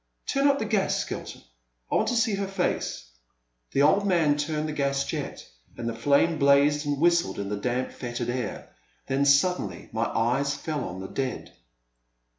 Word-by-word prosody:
Turn 275 0 +2
up 280 0 +4
the 220 - -2
gas, 210 -3 +1
Skelton, - - -5 0.5
I - - +1
want - - +2
to 245 - 0
see 230 -2 +2
her 195 0 -1
face." 125 - -2 0.6
The 140 - +2
old 200 +7 +4
man 165 -6 +3
turned 150 +1 -2
the - - -3
gas 140 -1 0
jet, - - -5 0.3
and 120 - -4
the 115 - -1
flame 140 +7 +2
blazed 145 +1 +4
and 145 -1 -1
whistled 170 +1 +2
in 100 -1 -4
the 105 - -1
damp, 125 +4 -2
fetid 120 -1 -5
air. 125 -4 -4 0.4
Then 135 +1 +1
suddenly 140 - +2
my 110 +1 0
eyes 135 +6 0
fell 150 -1 -3
on 90 +1 -6
the 95 - -6
dead. 130 +3 -4
140 Hz, 180 wpm, -26 LUFS, 125-170 Hz, 0.6 s, up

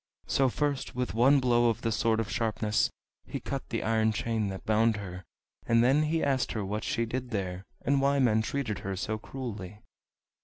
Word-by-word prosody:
So 135 -1 +2
first 145 0 -2
with 125 0 -2
one 130 +5 +5
blow 120 -2 +3
of 115 +1 -2
the 115 - 0
Sword 110 +1 +2
of 110 -2 -2
Sharpness 110 -2 +1 0.4
he - - -4
cut - - -5
the - - -2
iron 110 0 +2
chain 110 -1 -1
that 95 -1 -6
bound 110 0 +3
her, 90 -2 -7 0.4
and 115 0 +4
then 135 +5 +4
he 160 +1 +1
asked 135 -3 +1
her 110 -3 -2
what 105 +3 -3
she 120 -4 0
did 125 +2 -4
there, 95 -4 -3 0.2
and 140 +1 +2
why 140 +1 +3
men 115 -5 +3
treated 110 -3 -2
her 95 0 -4
so 110 +3 -3
cruelly. 105 -5 -7
115 Hz, 195 wpm, -29 LUFS, 105-130 Hz, 0.4 s, one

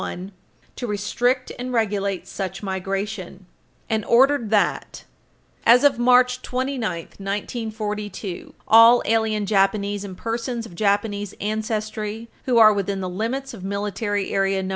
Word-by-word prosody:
1, 185 +3 -6 0.5
to 245 - -4
restrict 245 +5 0
and 250 +1 -4
regulate 200 -5 -1
such 190 0 -5
migration, 195 0 -4 0.4
and 220 -1 0
ordered 260 -1 +4
that, 210 -1 0 0.6
as 245 +3 +6
of 275 -4 +4
March 250 +1 +4
29, 260 +1 -3 0.4
1942," 210 -1 -5
"all 230 +2 +7
alien 220 -2 +1
Japanese 200 0 +1
and 190 -2 -8
persons 230 +1 -3
of 205 - -12
Japanese 205 +1 0
ancestry 215 +1 -3 0.2
who 250 -3 +2
are 215 -2 +8
within 200 -1 -2
the 185 - -3
limits 230 +9 -3
of 200 -5 -10
Military 200 +1 -2
Area 195 0 +1
No. 190 - -4
210 Hz, 130 wpm, -22 LUFS, 195-235 Hz, 0.6 s, are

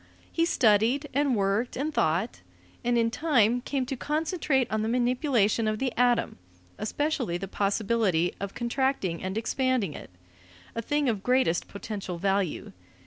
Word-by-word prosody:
He 330 - +2
studied 240 +1 +3
and 280 -2 +2
worked 200 +4 0
and 300 +4 -2
thought, 175 - 0 0.4
and 240 0 +2
in 230 0 +2
time 245 -4 +2
came 265 0 -2
to 270 +2 -3
concentrate 300 -1 0
on 215 0 0
the 220 - -1
manipulation 240 -3 +2
of 215 0 0
the 260 +1 -1
atom, 245 - +2 0.4
especially 250 - -1
the 195 +2 -5
possibility 200 -3 +1
of 200 0 -5
contracting 240 -8 -1
and 190 +2 -3
expanding 245 - 0
it - - -10 0.6
a 230 - -3
thing 290 +4 0
of 215 -5 0
greatest 250 -8 +1
potential 200 -3 -6
value. 195 - -1
235 Hz, 145 wpm, -27 LUFS, 200-265 Hz, 0.6 s, studied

